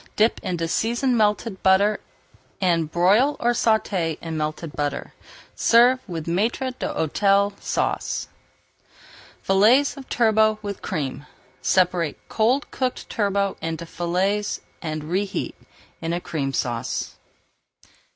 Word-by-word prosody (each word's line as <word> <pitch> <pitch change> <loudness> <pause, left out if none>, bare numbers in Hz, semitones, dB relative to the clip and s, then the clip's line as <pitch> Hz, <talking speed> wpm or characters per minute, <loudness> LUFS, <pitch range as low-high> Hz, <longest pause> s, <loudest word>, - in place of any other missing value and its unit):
Dip 220 +2 +3
in 180 - -2
seasoned 240 +8 +1
melted 210 -2 +1
butter 200 +2 +4 0.6
and 170 -4 +1
broil 205 - +3
or 240 - +2
sauté 205 -9 +1
in 165 -1 -5
melted 155 +1 -3
butter. 145 -1 -3 0.4
Serve 245 +2 +5
with 165 -3 -4
Maître 225 +9 0
d'Hôtel 200 +5 +1
Sauce. - - -1 1.2
FILLETS 230 +10 +4
OF 270 - -10
TURBOT 220 -2 +3
WITH 200 -1 -5
CREAM 140 -1 -4 0.3
Separate 180 -4 +2
cold 245 +6 +1
cooked 255 -1 -3
turbot 200 -2 0
into 165 0 -4
fillets 185 +5 -1 0.2
and 155 -2 -4
reheat 190 +5 -2 0.5
in 165 0 -2
a 175 - -1
Cream 145 -6 -3
Sauce. 120 -2 -3
195 Hz, 110 wpm, -23 LUFS, 165-220 Hz, 1.2 s, Serve